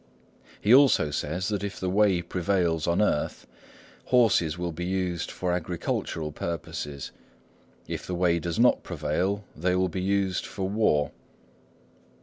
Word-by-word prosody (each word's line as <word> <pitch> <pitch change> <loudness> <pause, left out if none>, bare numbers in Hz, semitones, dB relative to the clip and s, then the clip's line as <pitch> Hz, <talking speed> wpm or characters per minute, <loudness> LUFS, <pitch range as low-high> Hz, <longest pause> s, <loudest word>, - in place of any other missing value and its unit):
He 105 - +4
also 130 - +5
says 85 +7 -2
that 100 -2 -2
if 100 -1 -4
the 95 - -2
Way 95 -2 +3
prevails 85 -2 0
on 85 +5 +3
earth, 75 -8 -1 0.6
horses 105 - +3
will 90 -1 -2
be 85 +2 -5
used 90 -2 -2
for 90 -1 -2
agricultural 80 -2 -2
purposes; 75 -3 -5 0.8
if - - -5
the 90 - -2
Way 85 -1 +2
does 85 +4 -3
not 125 +1 +5
prevail, 90 +5 -2
they 90 +3 0
will 95 0 +1
be 90 +2 -3
used 95 -1 0
for 95 -2 -3
war. 85 -8 +2
90 Hz, 140 wpm, -27 LUFS, 85-100 Hz, 0.8 s, also